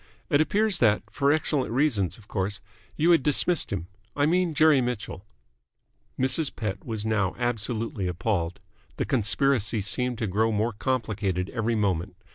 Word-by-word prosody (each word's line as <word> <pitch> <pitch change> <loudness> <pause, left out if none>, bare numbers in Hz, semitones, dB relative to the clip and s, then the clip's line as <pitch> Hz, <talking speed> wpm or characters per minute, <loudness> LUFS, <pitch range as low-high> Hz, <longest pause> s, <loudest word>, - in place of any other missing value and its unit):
It 145 - +5
appears 205 +3 +1
that 105 -3 +3
for 140 0 +2
excellent 145 -5 +1
reasons, 120 - +1
of 105 -3 -18
course 95 0 -2 0.4
you 165 +3 +4
had 165 - +5
dismissed 155 +5 +1
him. 95 -4 -3 0.3
I 145 - +2
mean 175 0 +1
Jerry 155 -3 +5
Mitchell." 110 -5 -4 0.9
Mrs. 130 +3 +2
Pett 100 -4 -4
was 110 -2 -4
now 105 -4 0
absolutely 115 -2 -2
appalled. 90 0 -2 0.4
The - - -1
conspiracy 120 -3 +1
seemed 125 +5 -1
to 110 - -2
grow 110 +3 +1
more 110 +2 0
complicated 105 -6 -2
every 115 0 -1
moment. 95 -3 -1
115 Hz, 150 wpm, -26 LUFS, 100-140 Hz, 0.9 s, It